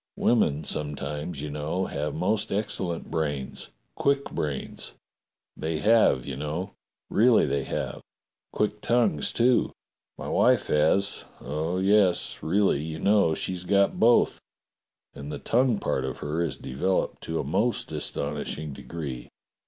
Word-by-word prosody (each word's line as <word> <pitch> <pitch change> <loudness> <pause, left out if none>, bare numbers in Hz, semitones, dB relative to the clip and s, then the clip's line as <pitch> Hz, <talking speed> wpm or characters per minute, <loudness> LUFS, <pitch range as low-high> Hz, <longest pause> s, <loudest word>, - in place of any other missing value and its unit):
Women 80 -11 +2
sometimes, 75 +1 -2
you 75 - -4
know, 75 +6 -2
have 75 +1 -3
most 100 +5 0
excellent 95 -4 -2
brains 75 -4 -2
— - - -47
quick 140 0 +1
brains. 75 -3 -4 0.6
They 80 0 -2
have, 105 - +4
you 70 - -4
know. 75 +8 -4 0.4
Really 115 +2 +5
they 70 -1 -1
have. - - -3 0.5
Quick 105 0 -1
tongues, 120 -11 +2
too. 120 +1 +3 0.5
My - - -6
wife - - +3
has. 85 +7 +2
Oh, 80 +4 -2
yes, 95 -1 +3
really, 95 -3 +2
you 80 0 -5
know, 100 -3 +3
she's 90 +1 -3
got 100 +2 +2
both, 120 +1 +4 0.7
and 70 +1 -7
the - - -4
tongue 125 -1 +2
part 65 - -1
of 65 -1 -4
her 75 +3 -2
is 85 - -1
developed 90 +9 -1
to 80 0 -2
a - - -1
most - - 0
aston 70 +1 -2
ishing 75 -2 -4
degree. 70 -5 -6
80 Hz, 140 wpm, -26 LUFS, 75-100 Hz, 0.7 s, Really